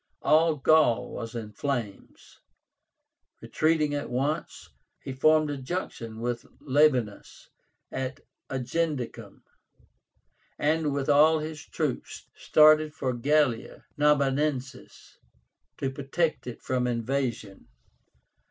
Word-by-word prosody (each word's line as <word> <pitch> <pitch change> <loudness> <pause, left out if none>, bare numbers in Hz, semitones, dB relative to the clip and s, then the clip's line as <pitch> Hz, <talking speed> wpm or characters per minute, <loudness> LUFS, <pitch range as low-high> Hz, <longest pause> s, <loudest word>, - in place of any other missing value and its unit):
All 160 +1 +4
Gaul 150 -4 +3
was 115 0 -7
in 110 -2 -6
flames. 120 -5 -5 1.0
Retreating 155 -2 0
at 145 0 -3
once, 140 +6 -3 0.4
he 135 - -5
formed 155 +2 +3
a 145 - -4
junction 130 -6 -5
with 120 0 -2 0.2
Labiénus 130 -7 0 0.4
at 130 0 -4 0.3
Agendicum, 135 +1 -3 1.1
and 155 0 +1
with 140 -1 -2
all 155 +2 +5
his 155 0 -6
troops - - -4
started 155 0 +4
for 130 -4 -2
Gallia 135 -1 0
Narbonensis 140 -2 -1 0.6
to 135 - -2
protect 145 +4 -2
it 120 - -8
from 125 -1 0
invasion. 120 -4 -3
140 Hz, 95 wpm, -27 LUFS, 125-155 Hz, 1.1 s, all